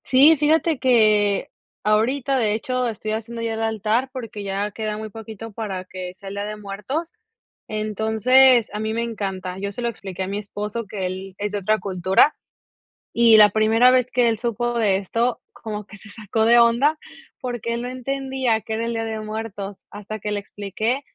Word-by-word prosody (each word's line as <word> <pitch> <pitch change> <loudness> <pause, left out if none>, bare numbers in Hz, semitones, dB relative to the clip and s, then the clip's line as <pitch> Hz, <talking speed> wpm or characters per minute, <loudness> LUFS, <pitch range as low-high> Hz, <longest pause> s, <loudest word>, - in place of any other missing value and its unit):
Sí, 280 +5 +6
fíjate 310 0 +2
que 215 -5 +3 0.3
ahorita, 245 +6 +1
de 215 -4 +2
hecho, 250 +3 -1
estoy 215 -1 -4
haciendo 230 +2 -4
ya 230 -1 -2
el 220 - -3
altar 220 +3 0
porque, 230 -5 -7
ya 200 +1 -2
queda 215 0 -4
muy 215 0 -6
poquito 225 +1 -9
para 195 -4 -4
que 185 -1 -7
sea 195 +1 -10
el 200 - -7
Día 200 - -3
de 210 0 -5
Muertos, 210 - -5 0.5
entonces 220 +4 +3
a 210 - -3
mí 220 0 -2
me 230 +1 -1
encanta, 190 -5 -4
yo 200 +1 -3
se 225 - -7
lo 235 - 0
expliqué 190 -4 -6
a - - -4
mi 200 +1 -3
esposo, 210 +2 -5
que 195 -2 -4
él 190 +1 -5
es 205 0 -3
de 205 - -2
otra 215 +3 +1
cultura 190 - +3 0.8
y 230 -1 +6
la 210 -1 +8
primera 220 +4 +4
vez 255 -1 +2
que 245 -1 +3
él 225 - 0
supo 240 0 -1
de 205 -4 +3
esto, 230 +5 -1
como 210 -2 -6
que 210 - -13
se 215 - -14
sacó 220 +1 -1
de 235 +1 +6
onda, 240 +7 +4 0.4
porque, 240 -2 -3
él 235 - -2
no 245 - -4
entendía 260 -2 -1
que 220 - -5
era 225 +1 -1
el 235 - -2
Día 225 0 -2
de 220 -1 -4
Muertos. 215 -2 -6
Hasta 210 +1 -7
que 210 +1 -4
le 205 - 0
expliqué, 210 +5 -3
220 Hz, 200 wpm, -22 LUFS, 205-240 Hz, 0.8 s, la